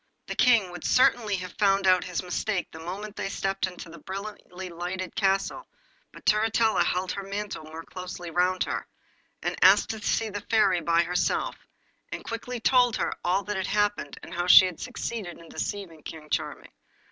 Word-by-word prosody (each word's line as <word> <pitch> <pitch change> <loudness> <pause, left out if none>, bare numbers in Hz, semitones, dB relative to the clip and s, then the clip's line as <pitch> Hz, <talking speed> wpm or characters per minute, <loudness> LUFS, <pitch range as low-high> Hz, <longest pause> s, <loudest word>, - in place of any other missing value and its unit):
The - - -5
King 230 -7 +4
would 175 -2 -8
certainly 235 -4 +3
have 185 -1 -6
found 195 -1 +3
out 185 -1 +5
his 180 0 -3
mistake 180 +2 -2
the 160 - -10
moment 195 +5 -6
they - - -3
stepped 195 -1 -1
into 180 -1 -9
the 165 0 -11
brilliantly 190 0 -7
lighted 180 +2 -5
castle, 195 - 0 0.4
but - - -15
Turritella 220 +1 +3
held 185 +1 -1
her 200 - -4
mantle 200 -4 -5
more 160 +1 -8
closely 180 -1 -7
round 180 +2 +2
her, - - -4 0.6
and - - -1
asked - - +6
to 220 -1 -6
see 220 +1 0
the 205 0 -4
Fairy 195 -5 +3
by 170 +1 +3
herself, 180 +1 0 0.6
and - - -6
quickly 240 +2 -4
told 245 0 +4
her - - -1
all 185 +3 +1
that 210 0 -3
had 190 - -2
happened, 205 0 0
and - - -9
how 175 +1 -1
she 185 - +10
had 180 -3 -4
succeeded 230 -7 -5
in 165 -1 -14
deceiving 185 -6 -5
King 155 0 -10
Charming. - - -3
190 Hz, 180 wpm, -27 LUFS, 175-210 Hz, 0.6 s, she